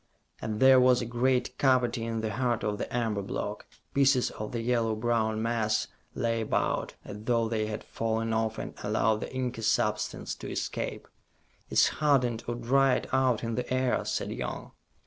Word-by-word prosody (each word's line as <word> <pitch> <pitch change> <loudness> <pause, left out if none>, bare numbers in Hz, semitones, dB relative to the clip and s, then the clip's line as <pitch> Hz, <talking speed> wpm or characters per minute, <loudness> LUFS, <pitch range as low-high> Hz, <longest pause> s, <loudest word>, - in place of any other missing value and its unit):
And 110 -1 -3
there 130 0 +7
was 125 -1 +5
a 120 - -2
great 125 +2 0
cavity 125 -3 +2
in 115 -1 -2
the 110 -1 -2
heart 120 0 0
of 105 0 -1
the - - -4
amber 115 -4 0
block. 100 - -4 0.3
Pieces 135 -2 +3
of 105 - -6
the 115 - -2
yellow 115 -2 +1
brown 110 -1 0
mass 110 -2 0 0.3
lay 115 -1 0
about, 110 - -1
as 100 - -7
though 115 -1 +2
they 110 -1 -1
had 105 0 -5
fallen 115 0 -2
off 110 0 0
and - - -5
allowed 110 +1 +1
the - - -5
inky 125 -3 -3
substance 105 -1 0
to - - -8
escape. - - -4 0.6
"It's - - +5
hardened 125 -6 +1
or 120 - -1
dried 130 +2 +2
out 130 -4 +2
in 115 0 -2
the 125 +2 -3
air," 130 -1 +1
said - - -2
Young. - - -5
115 Hz, 175 wpm, -29 LUFS, 110-125 Hz, 0.6 s, there